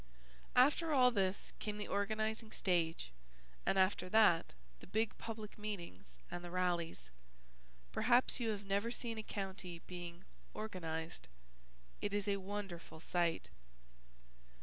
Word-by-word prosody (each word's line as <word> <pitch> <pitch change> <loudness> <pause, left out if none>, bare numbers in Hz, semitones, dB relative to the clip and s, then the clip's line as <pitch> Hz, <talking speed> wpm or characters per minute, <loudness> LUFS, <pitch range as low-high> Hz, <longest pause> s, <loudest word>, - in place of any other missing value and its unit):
After 295 +6 +5
all 250 -2 +7
this 195 -3 0
came 210 -1 -3
the 210 - -3
organizing 215 +2 0
stage 165 - +1 0.6
and 195 - +3
after 185 -1 +3
that 195 - +5 0.2
the - - -12
big 220 0 +1
public 215 -2 -6
meetings 170 - -6
and 175 - -4
the 175 - -5
rallies. 170 - -1 0.8
Perhaps 245 - +4
you 235 -2 0
have 205 -2 -2
never 200 +3 +1
seen 235 -2 -4
a - - -1
county 190 -4 -4
being 175 0 -7 0.3
"organized." 165 - -4 0.7
It 205 0 0
is 205 -1 0
a 200 -1 +2
wonderful 195 -5 -5
sight. 170 - 0
195 Hz, 125 wpm, -38 LUFS, 175-215 Hz, 0.8 s, all